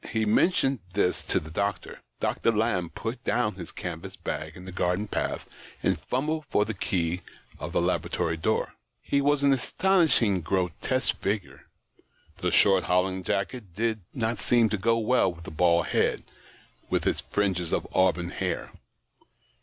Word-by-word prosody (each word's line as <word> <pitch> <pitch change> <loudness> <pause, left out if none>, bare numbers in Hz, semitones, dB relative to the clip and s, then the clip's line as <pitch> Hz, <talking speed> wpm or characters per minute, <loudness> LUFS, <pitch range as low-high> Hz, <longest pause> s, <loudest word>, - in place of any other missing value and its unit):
He 110 -1 0
mentioned 135 - +3
this 95 -2 +1
to - - +2
the 80 - -10
doctor. 100 +2 -2 0.2
Dr. 115 - +1
Lamb 105 -6 0
put 115 +6 -5
down 120 -3 +1
his 90 -2 -8
canvas 85 -2 -6
bag - - -5
in 90 - -10
the 95 - -7
garden 90 +3 0
path, - - -2 0.4
and - - +2
fumbled 155 +4 -2
for 105 - +3
the 110 - -3
key 90 -3 -1 0.4
of - - -5
the - - +1
laboratory 85 -2 0
door. 80 - 0 0.3
He 140 - +1
was 145 0 +2
an 140 -1 +5
astonishing 135 - +2
grotesque 95 +9 0
figure; 100 -1 -3 0.7
the - - 0
short 95 -2 +4
holland 95 +1 +1
jacket 100 -1 -2
did 110 0 0
not 115 -2 -1
seem 120 -2 +4
to 105 - 0
go 115 +3 +3
well 115 -3 +3
with 85 -1 -12
the - - -8
bald 85 +1 +3
head, - - +1 0.7
with - - 0
its - - +1
fringe 100 -3 0
of - - 0
auburn 90 -2 +2
hair. - - -3
100 Hz, 160 wpm, -27 LUFS, 90-120 Hz, 0.7 s, an